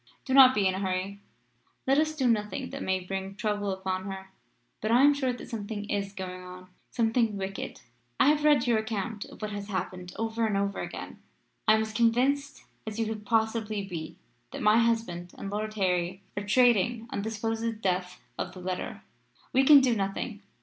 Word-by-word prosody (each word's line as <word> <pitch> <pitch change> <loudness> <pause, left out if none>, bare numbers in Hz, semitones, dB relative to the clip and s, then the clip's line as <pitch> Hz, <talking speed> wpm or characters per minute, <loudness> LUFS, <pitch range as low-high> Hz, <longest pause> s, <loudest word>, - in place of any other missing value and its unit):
Do 260 - -1
not 260 -1 +9
be 205 -2 +2
in 190 - +3
a 190 - -3
hurry. 190 +1 -2 0.7
Let 270 +2 +4
us 310 0 +1
do 265 -4 +1
nothing 210 -4 0
that - - -6
may 190 0 0
bring 195 +1 -5
trouble 205 -1 -1
upon 190 0 -3
her. 190 -1 -7 0.5
But 215 - -1
I 240 +4 +5
am 290 +1 +7
sure 265 -3 0
that 245 - -8
something 210 -2 -5
is 200 -1 -1
going 185 -2 -6
on 180 0 -11 0.2
something 225 -2 +1
wicked. 195 0 -5 0.4
I 275 - +6
have 300 0 +2
read 295 -5 +5
your 235 -3 +3
account 220 -1 -3
of - - -14
what 215 - -3
has 205 -1 -5
happened 185 -2 -4
over 225 0 -1
and 205 -2 0
over 200 0 -1
again. - - -6 0.5
I 215 - +7
am 220 - +2
as 220 0 -6
convinced 260 +5 +1 0.2
as 215 0 -4
you 225 - +1
could 215 -1 -5
possibly 220 -2 0
be 165 -3 -6 0.3
that - - -6
my 210 +2 +6
husband 225 -7 0
and 195 - -6
Lord 215 +1 -3
Harry 185 -1 0
are 205 - -2
trading 235 +1 +3
on - - -2
the 220 - -3
supposed 225 +1 -2
death 180 -1 -1 0.2
of - - -3
the 185 - -10
letter. 180 0 -4 0.5
We 265 - +5
can 285 0 +9
do 255 -2 +3
nothing. 200 +2 -3
210 Hz, 200 wpm, -28 LUFS, 190-230 Hz, 0.7 s, not